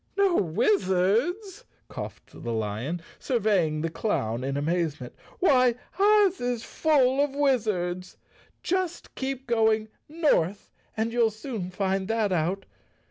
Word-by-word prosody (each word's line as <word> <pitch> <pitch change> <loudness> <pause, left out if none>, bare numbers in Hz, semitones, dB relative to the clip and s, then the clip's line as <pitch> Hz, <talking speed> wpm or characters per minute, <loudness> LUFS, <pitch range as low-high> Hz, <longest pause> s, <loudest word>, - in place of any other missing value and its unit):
"No 395 -3 +3
wizards?" 235 - +1 0.2
coughed - - -8
the 120 - -4
lion, 115 +10 -3 0.2
surveying 195 - +1
the 165 - -1
clown 120 - -1
in 135 +1 -2
amazement.^ 150 -4 -2 0.2
4 370 - +2
Why, 255 -3 +5 0.5
Oz 370 -5 -2
is 245 -2 -2
full 280 -3 +2
of 285 -1 -3
wizards. 205 -10 0 0.5
Just 365 -1 -2
keep 265 0 -4
going 220 -2 +2 0.2
north 285 - +1 0.3
and 225 +1 -1
you'll 235 -2 +3
soon 215 -3 -6
find 190 0 -1
that 220 -2 0
out. 180 +3 0
220 Hz, 125 wpm, -26 LUFS, 175-270 Hz, 0.5 s, Why